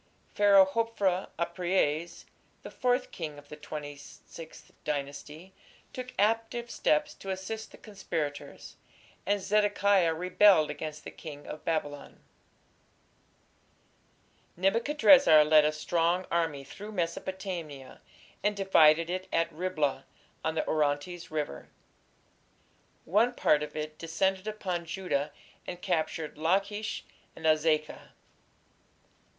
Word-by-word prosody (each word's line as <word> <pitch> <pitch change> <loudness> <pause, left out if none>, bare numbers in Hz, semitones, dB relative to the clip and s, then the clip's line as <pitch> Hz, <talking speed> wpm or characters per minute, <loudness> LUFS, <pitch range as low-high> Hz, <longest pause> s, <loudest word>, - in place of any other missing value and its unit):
Pharaoh 200 -2 +6
Hophra 200 -3 0
(Apries), 170 -1 -1 0.4
the - - -8
fourth 250 0 0
king 155 -4 -6
of 145 0 -14
the - - -8
Twenty 150 -1 -7
sixth 160 +3 -13
Dynasty, 150 +4 -5 0.4
took 255 0 -6
active 225 +3 0
steps 300 0 +1
to 195 - -10
assist 190 +4 -5
the - - -15
conspirators, 165 -8 -6 0.5
and 205 +1 +2
"Zedekiah 200 -4 +2
rebelled 180 -1 +4
against 155 -1 -6
the - - -8
king 145 -3 -10
of 155 - -8
Babylon". 145 -3 -3 2.4
Nebuchadrezzar 230 - +6
led 155 0 +6
a 150 - +3
strong 170 +4 0
army 165 -5 0
through 210 +9 -10
Mesopotamia, 170 -5 -5 0.4
and 210 0 +1
divided 165 -4 +5
it 185 +1 -4
at 165 0 0
Riblah, 155 -6 -1 0.4
on 160 0 -1
the - - -1
Orontes 155 +3 -1
River. 150 - -4 1.4
One 225 +7 +2
part 150 - +3
of 150 0 -6
it 155 0 -5
descended 190 +4 -1
upon 185 -5 -3
Judah 165 -5 -2 0.4
and 180 - -6
captured 160 -4 -2
Lachish 200 +6 0 0.3
and 160 - -9
Azekah. 155 -1 +1
170 Hz, 110 wpm, -29 LUFS, 155-200 Hz, 2.4 s, Pharaoh